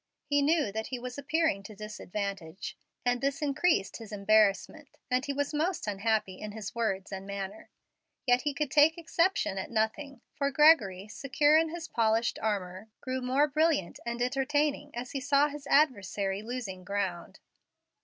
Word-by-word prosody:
He 285 Hz, -1 st, +2 dB
knew 295 Hz, -6 st, +2 dB
that 220 Hz, +2 st, -4 dB
he 255 Hz, -, -4 dB
was 250 Hz, +2 st, -6 dB
appearing 315 Hz, -6 st, +1 dB
to 205 Hz, +2 st, -11 dB
disadvantage, 200 Hz, -3 st, -5 dB, 0.3 s
and 245 Hz, 0 st, +1 dB
this 275 Hz, +1 st, 0 dB
increased 295 Hz, -, +1 dB
his 225 Hz, -2 st, -11 dB
embarrassment, 210 Hz, 0 st, +1 dB
and 255 Hz, +1 st, +2 dB
he 285 Hz, -, -2 dB
was 285 Hz, +2 st, -2 dB
most 330 Hz, +5 st, -1 dB
unhappy 205 Hz, -2 st, -1 dB
in 210 Hz, -1 st, -6 dB
his 215 Hz, -2 st, -6 dB
words 205 Hz, -5 st, -2 dB
and 195 Hz, 0 st, -6 dB
manner. 200 Hz, +1 st, -6 dB, 0.6 s
Yet 245 Hz, -1 st, +4 dB
he 290 Hz, -2 st, -2 dB
could 300 Hz, -2 st, -2 dB
take 310 Hz, +2 st, +5 dB
exception 335 Hz, -, 0 dB
at 190 Hz, -, -5 dB
nothing, 235 Hz, +4 st, -2 dB
for 280 Hz, 0 st, 0 dB
Gregory, 260 Hz, -, +4 dB
secure 280 Hz, +6 st, +2 dB
in 320 Hz, +1 st, +4 dB
his 335 Hz, 0 st, -6 dB
polished 225 Hz, 0 st, +1 dB
armor, 200 Hz, -1 st, -3 dB
grew 260 Hz, 0 st, -3 dB
more 265 Hz, +4 st, +2 dB
brilliant 305 Hz, -, +1 dB
and 235 Hz, +1 st, -2 dB
entertaining 290 Hz, +3 st, 0 dB
as 240 Hz, +1 st, -5 dB
he 275 Hz, -, -3 dB
saw 285 Hz, +2 st, +3 dB
his 285 Hz, -1 st, -9 dB
adversary 200 Hz, -, +2 dB
losing 220 Hz, -5 st, -5 dB
ground. 190 Hz, -2 st, -3 dB
245 Hz, 165 wpm, -30 LUFS, 200-290 Hz, 0.6 s, take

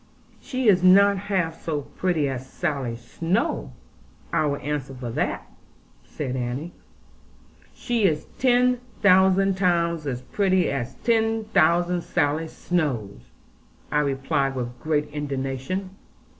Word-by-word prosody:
'She 255 Hz, -2 st, -2 dB
is 190 Hz, -4 st, +5 dB
not 200 Hz, +2 st, +6 dB
half 185 Hz, -4 st, -2 dB
so 150 Hz, -3 st, -2 dB
pretty 160 Hz, 0 st, -1 dB
as 130 Hz, -1 st, -5 dB
Sally 140 Hz, -8 st, -2 dB
Snowe; 120 Hz, -, -2 dB, 0.6 s
I 155 Hz, -, +2 dB
will 145 Hz, 0 st, -1 dB
answer 140 Hz, -2 st, -4 dB
for 125 Hz, -2 st, -6 dB
that,' -, -, -2 dB, 0.6 s
said 130 Hz, -4 st, -5 dB
Annie. 130 Hz, +7 st, -4 dB, 1.0 s
'She 235 Hz, -4 st, 0 dB
is 155 Hz, -4 st, +1 dB
ten 250 Hz, -1 st, +3 dB, 0.2 s
thousand 190 Hz, 0 st, +5 dB
times 170 Hz, -4 st, +1 dB
as 125 Hz, -2 st, -3 dB
pretty 185 Hz, +3 st, +1 dB
as 130 Hz, -1 st, -3 dB
ten 225 Hz, -1 st, +2 dB
thousand 175 Hz, -3 st, +2 dB
Sally 160 Hz, -1 st, 0 dB
Snowes,' 120 Hz, -, -3 dB, 0.6 s
I 150 Hz, -, +2 dB
replied 135 Hz, -1 st, 0 dB
with 125 Hz, -1 st, -5 dB
great 150 Hz, -1 st, 0 dB
indignation. 145 Hz, +5 st, -3 dB
155 Hz, 120 wpm, -24 LUFS, 135-190 Hz, 1.0 s, not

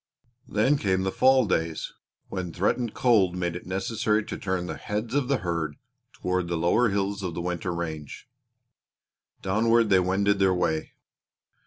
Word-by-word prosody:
Then 130 Hz, +7 st, +2 dB
came 95 Hz, -2 st, +1 dB
the 95 Hz, -, 0 dB
fall 130 Hz, +1 st, +4 dB
days, 80 Hz, -5 st, -1 dB, 0.3 s
when 90 Hz, -3 st, -4 dB
threatened 105 Hz, +7 st, -1 dB
cold 100 Hz, -8 st, +3 dB
made 85 Hz, -2 st, -2 dB
it 85 Hz, -, -8 dB
necessary 105 Hz, +3 st, 0 dB
to -, -, -5 dB
turn 95 Hz, -2 st, -2 dB
the -, -, -4 dB
heads 105 Hz, +3 st, -4 dB
of 140 Hz, -3 st, +1 dB
the 140 Hz, 0 st, +2 dB
herd 85 Hz, -6 st, -2 dB, 0.4 s
toward 90 Hz, -1 st, -2 dB
the 85 Hz, -1 st, -1 dB
lower 100 Hz, +9 st, +3 dB
hills 100 Hz, 0 st, -1 dB
of 90 Hz, -4 st, -4 dB
the -, -, -3 dB
winter 90 Hz, 0 st, -2 dB
range. 80 Hz, -4 st, -5 dB, 1.2 s
Downward 115 Hz, +3 st, +2 dB
they 95 Hz, -, +6 dB
wended 100 Hz, +2 st, +1 dB
their 95 Hz, -1 st, +3 dB
way. 80 Hz, -3 st, -1 dB
95 Hz, 160 wpm, -26 LUFS, 85-110 Hz, 1.2 s, they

